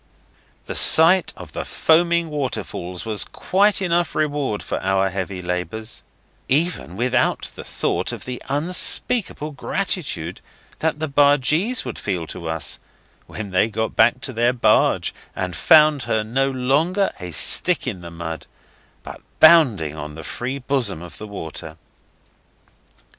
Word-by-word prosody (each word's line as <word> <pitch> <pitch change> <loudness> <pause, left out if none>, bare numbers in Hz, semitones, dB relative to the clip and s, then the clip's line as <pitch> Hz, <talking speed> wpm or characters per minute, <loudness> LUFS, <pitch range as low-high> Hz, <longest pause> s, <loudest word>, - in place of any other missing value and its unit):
The - - -5
sight 170 +3 +5
of - - -11
the - - -4
foaming 170 +1 +2
waterfalls 115 -10 -4
was 110 -2 -1
quite 200 +1 +1
enough 175 -2 0
reward 145 -8 -1
for - - -3
our 95 0 +1
heavy 95 0 -4
labours, 90 +6 -4 0.5
even 150 - 0
without 125 +4 0
the - - -9
thought - - -2
of - - -8
the 125 -1 -6
unspeakable 165 - +1
gratitude 140 - -2 0.4
that 160 -1 0
the 155 +1 -3
bargees 145 - +2
would 125 - -6
feel 90 -5 -3
to 80 +1 -7
us 80 -1 -1 0.5
when 105 -3 -7
they 95 +4 +2
got 110 +1 -3
back 120 +3 +3
to 130 - -3
their 120 +2 +2
barge 120 - +2 0.2
and 90 -2 -3
found 150 - +5
her 110 -1 +1
no 135 +5 0
longer 145 +10 +1
a 90 -1 -6
stick 170 - +2
in 105 -9 -4
the 85 - -8
mud, 85 -2 -7 0.6
but - - -10 0.2
bounding 130 - +5
on 75 0 -7
the 80 - -9
free 125 - -4
bosom 125 - -1
of 90 - -11
the 110 - -7
river. 80 -4 -7
125 Hz, 140 wpm, -21 LUFS, 95-155 Hz, 0.6 s, sight